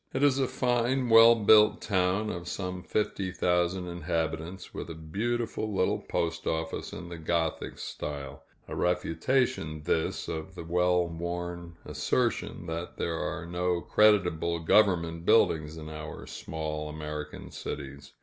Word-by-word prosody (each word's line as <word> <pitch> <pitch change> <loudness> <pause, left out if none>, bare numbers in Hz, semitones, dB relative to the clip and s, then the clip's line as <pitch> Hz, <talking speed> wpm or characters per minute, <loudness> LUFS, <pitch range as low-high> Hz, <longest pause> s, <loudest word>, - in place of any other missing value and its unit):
It 135 - +1
is 140 -2 +4
a 130 - +2
fine, 125 +1 +1
well 115 +1 +9
built 105 -1 +6
town, 95 +2 +1
of 85 0 -6
some 90 -1 -4
fifty 100 -1 -1
thousand 90 0 +1
inhabitants, 85 +1 -3
with - - -6
a 85 - -6
beautiful 110 +7 -2
little 95 -2 +1
postoffice 80 -1 -2
in 85 - -7
the 85 -1 -7
Gothic 80 0 -1
style 70 -2 -6 0.3
a - - -5
refutation, 90 - 0
this, 80 0 0
of 80 +4 -5
the 85 - -6
well 90 +1 +2
worn 85 0 -5
assertion - - -1
that 85 +1 -5
there 85 -1 -2
are 85 0 -3
no 90 +1 0
creditable 90 -5 +3
government 85 -3 +3
buildings 80 -7 +3
in 80 -1 -8
our 75 -1 -7
small 75 -1 -5
American 75 0 -6
cities. 70 0 -7
85 Hz, 135 wpm, -29 LUFS, 80-100 Hz, 0.3 s, well